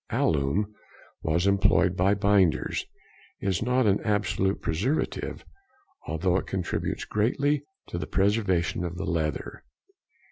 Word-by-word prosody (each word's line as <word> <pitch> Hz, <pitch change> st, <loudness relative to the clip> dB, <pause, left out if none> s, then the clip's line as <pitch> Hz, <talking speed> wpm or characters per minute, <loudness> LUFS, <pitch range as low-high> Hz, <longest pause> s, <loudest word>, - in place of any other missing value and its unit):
Alum, 80 Hz, +8 st, +1 dB, 0.6 s
as 85 Hz, +4 st, +2 dB
employed 100 Hz, -2 st, +3 dB
by 95 Hz, +2 st, +3 dB
binders, 100 Hz, -4 st, +2 dB, 0.5 s
is 95 Hz, -2 st, -1 dB
not 125 Hz, +2 st, +2 dB
an 100 Hz, -1 st, +3 dB
absolute 105 Hz, -2 st, 0 dB
preservative, 110 Hz, -, -2 dB, 0.6 s
although 90 Hz, +3 st, +1 dB
it -, -, -3 dB
contributes 95 Hz, -3 st, -2 dB
greatly 140 Hz, +7 st, +1 dB, 0.2 s
to 85 Hz, -, -5 dB
the -, -, -4 dB
preservation 95 Hz, -4 st, +1 dB
of 85 Hz, 0 st, -4 dB
the 100 Hz, -, -3 dB
leather. 80 Hz, -5 st, -2 dB
95 Hz, 115 wpm, -27 LUFS, 85-105 Hz, 0.6 s, employed